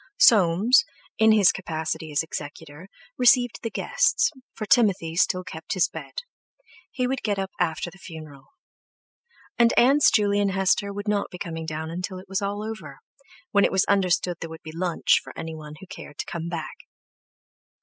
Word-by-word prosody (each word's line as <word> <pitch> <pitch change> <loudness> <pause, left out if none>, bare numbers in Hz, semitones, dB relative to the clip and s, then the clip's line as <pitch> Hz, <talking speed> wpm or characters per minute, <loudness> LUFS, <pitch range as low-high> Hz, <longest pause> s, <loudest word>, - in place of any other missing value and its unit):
Soames, 205 - +5 0.4
in 220 0 +6
his 210 -4 +6
capacity 160 -3 -4
of 145 - -3
executor, 155 +2 -8 0.3
received 245 -1 +4
the 230 - -3
guests, 475 - +1 0.2
for 215 - -6
Timothy 200 -10 +2
still 185 +1 +2
kept 160 -1 -6
his 185 - +3
bed; - - -8 0.7
he 255 -2 -2
would 260 +1 -2
get 205 -2 -1
up 195 0 -3
after 175 0 -1
the 190 - -18
funeral; 155 -7 -11 1.1
and 235 -1 +5
Aunts 275 +4 +6
Juley 205 -2 +2
and 200 -1 +1
Hester 195 +1 +1
would 205 +1 -6
not 205 -1 0
be 180 - -9
coming 165 -2 -5
down 160 +3 -4
till 185 0 -5
all 185 - -9
was 195 +2 -2
over, 200 -7 -5 0.5
when 200 -1 +4
it - - +3
was 190 -1 +2
understood 180 -3 +1
there 165 - -5
would 160 0 -11
be 155 - -9
lunch 175 0 +2
for - - -12
anyone 155 -2 -7
who - - -11
cared 150 -4 -11
to - - -3
come 170 0 -5
back. 170 -2 -5
185 Hz, 170 wpm, -25 LUFS, 160-210 Hz, 1.1 s, in